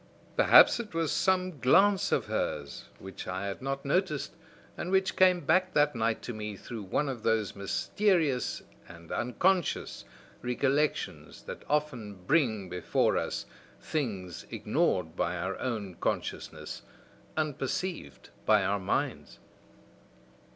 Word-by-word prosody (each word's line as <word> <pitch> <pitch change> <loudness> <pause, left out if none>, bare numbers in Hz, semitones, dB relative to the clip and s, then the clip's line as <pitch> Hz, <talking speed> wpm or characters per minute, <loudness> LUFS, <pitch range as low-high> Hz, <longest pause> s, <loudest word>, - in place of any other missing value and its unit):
Perhaps - - +7
it 215 -7 -6
was 165 -2 +1
some 185 -4 +1
glance 195 +10 +4
of - - +2
hers 70 -1 -3
which 95 0 -9
I 95 +2 -3
had 100 +3 -4
not 135 +1 -3
noticed 155 0 0 0.4
and 180 - -4
which 190 0 +2
came 185 -1 +5
back 185 +3 +2
that 145 -2 +3
night 115 -1 0
to 120 - -5
me 105 -1 -5
through 115 +2 -7
one 135 +9 -1
of 130 -4 -4
those 110 -2 0
mysterious 150 - 0 0.2
and 85 -1 -13
unconscious 175 +9 0 0.4
recollections 125 - -1
that - - -8
often 130 -9 -1
bring 110 - +2
before 90 -1 +1
us - - -2 0.3
things 100 - -4
ignored 80 +1 0
by 85 0 -1
our 95 +2 -2
own 110 -7 -3
consciousness, - - -3 0.6
unperceived 150 - -3
by 105 -2 +4
our 100 +1 +1
minds!" 95 - -2
125 Hz, 125 wpm, -30 LUFS, 100-165 Hz, 0.6 s, Perhaps